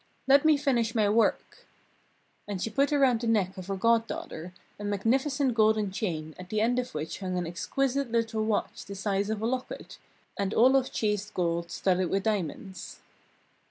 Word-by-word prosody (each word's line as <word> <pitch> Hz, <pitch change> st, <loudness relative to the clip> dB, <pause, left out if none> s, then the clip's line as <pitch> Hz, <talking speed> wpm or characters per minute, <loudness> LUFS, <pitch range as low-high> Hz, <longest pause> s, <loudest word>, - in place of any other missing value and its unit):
"Let 275 Hz, +1 st, +6 dB
me 310 Hz, -2 st, +6 dB
finish 240 Hz, -5 st, 0 dB
my 215 Hz, -2 st, +3 dB
work." 225 Hz, +2 st, 0 dB, 0.8 s
And 200 Hz, -2 st, -3 dB
she 225 Hz, -, -3 dB
put 280 Hz, +7 st, +2 dB
around 265 Hz, -5 st, +3 dB
the 235 Hz, -, -2 dB
neck 200 Hz, -4 st, +1 dB
of 185 Hz, -1 st, -8 dB
her 195 Hz, -, -2 dB
goddaughter 225 Hz, -5 st, -1 dB, 0.3 s
a -, -, -6 dB
magnificent 255 Hz, +7 st, +1 dB
golden 215 Hz, -2 st, +3 dB
chain 160 Hz, -6 st, -3 dB
at 185 Hz, 0 st, -9 dB
the 215 Hz, -, 0 dB
end 240 Hz, +3 st, +2 dB
of 250 Hz, -7 st, -5 dB
which 155 Hz, +1 st, -4 dB
hung 185 Hz, -2 st, -3 dB
an 175 Hz, -, -1 dB
exquisite 270 Hz, +9 st, -1 dB
little 225 Hz, -1 st, 0 dB
watch 215 Hz, -1 st, -1 dB
the 200 Hz, -, -8 dB
size 200 Hz, 0 st, -1 dB
of 220 Hz, 0 st, -2 dB
a -, -, +1 dB
locket, 255 Hz, +2 st, -4 dB, 0.4 s
and 200 Hz, +1 st, -1 dB
all 255 Hz, +4 st, +6 dB
of 265 Hz, -1 st, +2 dB
chased 210 Hz, -1 st, -1 dB
gold 170 Hz, -1 st, -1 dB
studded 180 Hz, 0 st, 0 dB
with 195 Hz, 0 st, 0 dB
diamonds. 190 Hz, -3 st, -3 dB
215 Hz, 180 wpm, -28 LUFS, 190-240 Hz, 0.8 s, Let